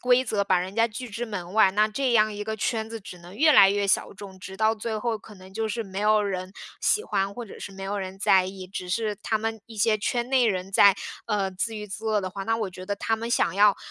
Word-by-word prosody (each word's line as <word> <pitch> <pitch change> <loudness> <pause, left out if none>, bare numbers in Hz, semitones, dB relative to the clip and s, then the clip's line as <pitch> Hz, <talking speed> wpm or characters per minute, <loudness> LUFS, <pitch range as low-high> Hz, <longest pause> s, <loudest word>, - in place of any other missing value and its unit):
规 250 +1 +3
则， 210 -3 0
把 190 -2 +2
人 185 +2 -4
家 230 0 +3
拒 245 +3 -7
之 230 +3 -4
门 185 -5 -6
外， 215 -2 +5
那 210 +2 +3
这 250 +3 -1
样 215 -1 +4
一 205 0 -5
个 220 +1 -4
圈 220 0 -2
子 225 - -5
只 185 -2 -10
能 175 +3 -13
越 310 +2 +5
来 195 -8 +8
越 200 0 0
小 - - +1
众， 195 -1 -11
直 190 +1 -9
到 220 +2 +2
最 220 0 -4
后 230 0 -1
可 210 0 -14
能 185 0 -14
就 220 +1 -1
是 230 +2 -2
没 190 0 -6
有 215 0 +4
人 185 -2 -4 0.3
喜 430 - +2
欢， 195 0 -1
或 240 +3 -7
者 - - -11
是 - - -6
没 195 - -9
有 200 +1 -3
人 190 -1 -5
在 190 -2 +4
意。 190 -1 -8
只 185 -1 -6
是 215 +2 -1
他 220 - 0
们 225 0 -3
一 225 - -12
些 215 +1 +3
圈 240 +3 -2
内 255 -3 +3
人 190 0 -3
在， 200 0 +6 0.3
呃， 205 -3 0
自 220 +4 -3
娱 210 0 -6
自 210 +3 -8
乐 215 -1 +1
的 190 - -3
话， 195 +1 -6
那 225 +3 0
我 215 -4 -3
觉 185 0 -9
得 200 +1 -3
他 225 +2 0
们 230 +1 -5
想 185 -6 +2
要 205 0 +5
210 Hz, 300 characters per minute, -25 LUFS, 195-225 Hz, 0.3 s, 来